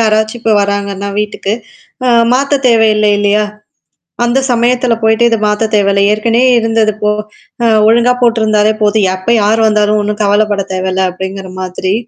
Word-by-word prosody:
யாராச்சும் 220 +1 0
இப்ப 225 -1 0
வராங்கன்னா 200 0 -3
வீட்டுக்கு 210 -1 -4 0.5
ஆ - - +2 0.3
மாத்த 275 +2 0
தேவையில்ல 220 -3 +3
இல்லையா, 205 +1 +1 0.8
அந்த 240 +3 +1
சமயத்தில 245 0 +1
போயிட்டு 220 +1 +2
இத 230 - +1
மாத்தத் 210 +1 -1
தேவையில்ல 200 -1 +2
ஏற்கனவே 230 +4 +1
இருந்தது 225 -1 0
போ 210 - +2 0.8
ஒழுங்கா 235 +2 +3
போட்டிருந்தாலே 220 -2 +2
போதும் 210 -1 +2
எப்போ 185 +4 -4
யார் 220 +2 +1
வந்தாலும் 210 0 +1
ஒண்ணும் 210 +1 -4
கவலப்படத் 205 -1 0
தேவயில்ல 185 0 -1
அப்டிங்கிற 190 0 -7
மாதிரி 185 +1 -3
215 Hz, 140 wpm, -12 LUFS, 200-225 Hz, 0.8 s, தேவையில்ல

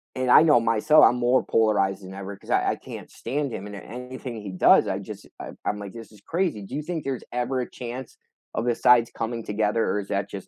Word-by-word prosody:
and 130 -1 0
I - - +9
know 150 -6 +5
myself, 115 +7 +4
I'm 125 - +4
more 125 +1 +2
polarized 100 -3 +1
than 95 +1 -9
ever 100 +1 -7
because - - -18
I - - +2
I - - -2
can't - - -10
stand 135 0 -3
him, 100 +2 -6
and 105 - -8
anything 125 +1 -8
he 100 -2 -7
does, 90 - +5
I - - -1
just, - - -9
I - - -7 0.2
I'm 105 - -1
like, 100 -2 -8
"This 115 -1 -10
is 105 -2 -18
crazy." 165 - -2
Do 125 +8 -7
you 150 - -2
think 160 -1 -4
there's 135 -3 -3
ever 125 +1 -1
a - - -5
chance, 125 +1 -8 0.4
of - - -1
the 120 -1 +1
sides 120 -2 +4
coming 115 0 -3
together, 105 +2 0
or 105 - 0
is 100 - -6
that 100 -1 -1
just 95 -1 -8
115 Hz, 245 wpm, -25 LUFS, 105-130 Hz, 0.4 s, I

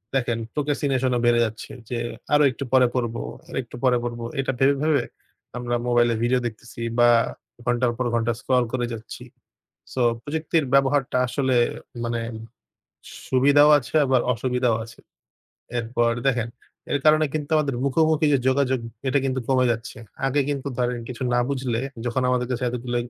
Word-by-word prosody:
দেখেন 120 -3 0
procrastination 140 -3 0
ও - - -1
বেড়ে 120 0 +4
যাচ্ছে। 110 0 -7 0.2
যে, 125 - -2 0.4
আরো 150 0 +6
একটু 135 - -6
পরে 130 -1 +6
পড়ব, 120 -2 -1 0.3
আরো - - -6
একটু 120 - -12
পরে 125 -2 +4
পড়ব। 120 -1 -4 0.2
এটা 135 0 0
ভেবে, 140 +1 +4
ভেবে 155 -2 +2 0.5
আমরা 120 0 -2
মোবাইলে 120 -1 +3
ভিডিও 125 +1 +2
দেখতেছি 115 +1 -10 0.2
বা 120 0 +6 0.6
ঘন্টার 120 0 +1
পর 130 - -1
ঘন্টা 115 0 +1
স্ক্রল 130 -1 +2
করে 125 -1 0
যাচ্ছি। 110 -1 -8 0.7
সো, 130 - -3 0.2
প্রযুক্তির 155 +1 -1
ব্যবহারটা 135 -1 +3
আসলে 130 0 0 0.5
মানে, 115 0 -1 1.1
সুবিধাও 145 +3 +5
আছে 120 -1 -9
আবার 130 -1 +3
অসুবিধাও 125 0 0
আছে। 115 0 -14 0.8
এরপর 115 0 +1
দেখেন, 120 -4 +1 0.4
এর 145 - +2
কারণে 155 0 +5
কিন্তু 150 -2 -3
আমাদের 145 -3 +1
মুখো-মুখি 155 +3 +2
যে 140 - +4
যোগাযোগ 130 -1 +1 0.3
এটা 140 - +3
কিন্তু 130 -1 -1
কমে 130 -1 +3
যাচ্ছে। 115 0 -7 0.3
আগে 140 +2 +2
কিন্তু 140 -1 -2
ধরেন 125 -1 0
কিছু 125 0 -6
না - - +3
বুঝলে 130 -4 -1 0.3
যখন 125 +2 0
আমাদের 125 -1 +1
কাছে 125 0 -1
এতগুলো 120 0 -3
125 Hz, 160 wpm, -24 LUFS, 120-140 Hz, 1.1 s, আরো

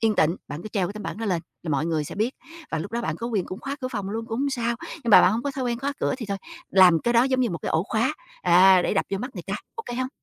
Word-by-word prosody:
yên 225 -1 +2
tịnh, 165 -1 +2
bạn 150 +3 -6
cứ 215 - -6
treo 195 -4 0
cái 190 - -5
tấm 210 0 -7
bảng - - -5
đó 225 - -3
lên 175 -5 0 0.2
là 165 - -4
mọi 145 +2 +1
người 160 -3 0
sẽ - - -7
biết, 220 +6 -1 0.4
và 160 - -1
lúc 175 +8 -6
đó 235 - -1
bạn 160 -9 -2
có 230 - -4
quyền 215 -6 0
cũng 185 - -7
khóa 275 +1 -4
cửa 255 - -2
phòng 205 -6 -4
luôn 225 +2 -4
cũng 225 0 -3
hông 280 0 +1
sao. 235 -2 -1 0.2
Nhưng 270 -8 -4
mà - - +10
bạn - - +5
hông 230 +2 -1
có 285 - -1
thói 270 -1 -4
quen 240 -1 -1
khóa 280 +3 -2
cửa - - +1
thì 230 - -5
thôi, 200 -1 -3 0.3
làm 180 -4 +6
cái 235 - +1
đó 235 - +6
giống 260 0 +1
như 245 - +1
một 170 - -3
cái - - -4
ổ 160 - +2
khóa, 235 +7 +1 0.3
à, 185 +1 +6
để - - 0
đập 195 - +2
vô 195 - -1
mắt 250 +6 -4
người - - -6
ta, - - -2 0.2
ô 455 - -5
kê 240 - -4
hông? 255 +1 -1
220 Hz, 345 wpm, -25 LUFS, 185-245 Hz, 0.4 s, mà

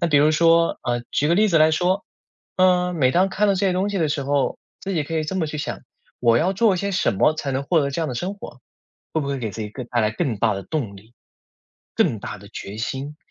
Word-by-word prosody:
那 170 - +1
比 145 - +3
如 150 +2 +5
说， 165 +1 +3
啊， 120 -1 -1
举 150 - +1
个 170 - +4
例 215 +3 +4
子 165 -4 +3
来 155 +1 +5
说， 180 +4 +1 0.5
嗯， 180 -1 +3
每 130 -4 +3
当 185 +5 +3
看 210 +2 +1
到 200 - +3
这 195 +1 +1
些 185 - +2
东 195 +3 0
西 200 - -2
的 160 -2 +1
时 145 -1 -1
候， 140 0 0 0.2
自 195 - -4
己 155 - +1
可 165 - -5
以 155 -1 0
这 190 +5 -3
么 165 -4 0
去 150 0 -5
想， - - -4 0.4
我 115 -1 +4
要 185 +7 +1
做 205 -1 +3
些 200 +3 -2
什 185 - +1
么 150 +11 +3
才 145 -3 -3
能 135 +1 -1
获 165 +2 +2
得 140 - -1
这 140 - -3
样 160 - -1
的 125 - -4
生 180 +11 -3
活， 140 -9 -11 0.5
会 160 - 0
不 140 - -4
会 140 - -1
给 115 -4 -3
自 110 - -8
己 105 - -4
更 125 +4 -7
带 120 -2 0
来 110 -1 +2
更 115 -2 -2
大 - - +2
的 100 - -5
动 110 - -3
力、 110 +4 -17 0.8
更 110 - +2
大 - - -6
的 100 0 -14
决 100 +2 -8
心， 135 +6 -4
155 Hz, 295 characters per minute, -22 LUFS, 125-180 Hz, 0.8 s, 如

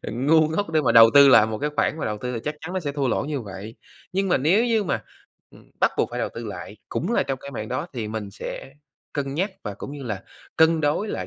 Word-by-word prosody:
ờ, - - -5
ngu 155 +6 +3
ngốc 165 +3 -2
để 155 -1 +2
mà 120 -5 +2
đầu 115 0 +9
tư 140 -1 +9
lại 110 -5 +7
một 110 -1 -4
cái 150 +4 -1
khoản 160 - +1
mà - - -3
đầu 105 -1 -3
tư 125 +2 -4
thì 115 - -3
chắc 150 - -2
chắn 180 +4 -7
nó 185 - 0
sẽ 145 -3 -3
thua 140 -2 -1
lỗ 135 - 0
như 145 -2 -3
vậy. 100 +1 -8 0.4
Nhưng 195 +1 0
mà - - +3
nếu 180 - +3
như 225 -3 +1
mà, - - -2 0.5
ừm, - - -19
bắt - - +4
buộc - - +2
phải - - -5
đầu - - -1
tư 115 - -6
lại 100 +1 -8
cũng 190 +10 -2
là - - +3
trong 135 -1 -3
cái 140 - -8
mảng 110 -5 -6
đó 130 +7 -3
thì 115 -4 -4
mình 105 -2 -5
sẽ 135 - -7 0.4
cân 140 -2 -3
nhắc 190 +6 -1
và 105 - -5
cũng 135 - -8
như 145 - -8
là 105 -6 -4 0.3
cân 160 0 +4
đối 150 +8 0
lại - - -4
140 Hz, 280 wpm, -24 LUFS, 115-160 Hz, 0.5 s, đầu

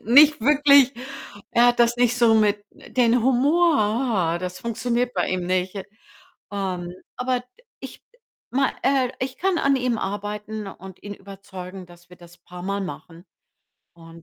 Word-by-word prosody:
Nicht 285 +5 +6
wirklich, 280 0 +5 0.6
er 240 +1 +5
hat 240 - +1
das 235 0 +3
nicht 245 0 +2
so 235 -2 +4
mit 210 -1 +2
den 240 -1 0
Humor, 250 - +2
das 180 0 -5
funktioniert 240 +2 -2
bei - - 0
ihm 180 -1 -2
nicht. 185 +2 -1 0.7
Ähm, 185 -3 -4 0.2
aber 250 0 -1 0.4
ich - - -10 0.5
ma 270 +1 +1
äh, 265 -2 +2
ich 260 +1 -4
kann 375 -2 +1
an 275 -2 +2
ihm 250 -3 -1
arbeiten 210 +2 -5
und 190 -1 -12
ihn 205 0 -7
überzeugen, 190 -2 -10
dass 175 0 -19
wir 180 - -14
das 175 0 -17
paarmal 180 +3 -5
machen. 175 -2 -9 0.7
Und, 165 0 -15
215 Hz, 145 wpm, -23 LUFS, 185-250 Hz, 0.7 s, Nicht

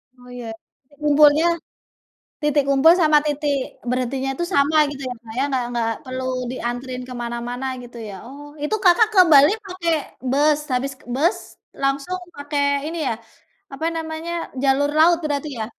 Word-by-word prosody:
Oh, 250 0 -17
iya. 240 -2 -7 0.4
Titik 290 0 -25
umpulnya 295 +2 +6 1.0
titik 295 -1 +3
kumpul 280 +5 +6
sama 305 -1 +5
titik 295 -1 0 0.3
berhentinya 255 +2 -1
itu 345 - -2
sama, 285 +2 +3 0.2
gitu 280 -1 -8
ya, - - -3
Kak, 220 - -10
ya? - - +2
Enggak 260 -3 -1
enggak 235 -2 -1 0.2
perlu 255 0 -5 0.3
dianterin 250 +1 -4
ke 255 - -8
mana-mana, 240 +2 -4 0.2
gitu 240 0 -12
ya? - - -8
Oh. 280 +3 -11 0.2
Itu 300 - 0
Kakak 375 +4 +6
ke 390 - +5
Bali 290 +5 +8
pakai 360 -3 -2 0.4
bus? 295 +2 +3
Habis 270 +2 -1 0.2
bus, 325 +6 +2 0.4
langsung 275 +7 -1 0.2
pakai, 285 0 -2 0.2
ini 335 - -5
ya - - +1 0.6
apa 320 +4 -2
namanya? 320 +1 -5 0.3
Jalur 275 +1 +2
laut, 335 +2 +6
berarti 295 0 -2
ya? 220 - -2
280 Hz, 160 wpm, -21 LUFS, 255-310 Hz, 1.0 s, Bali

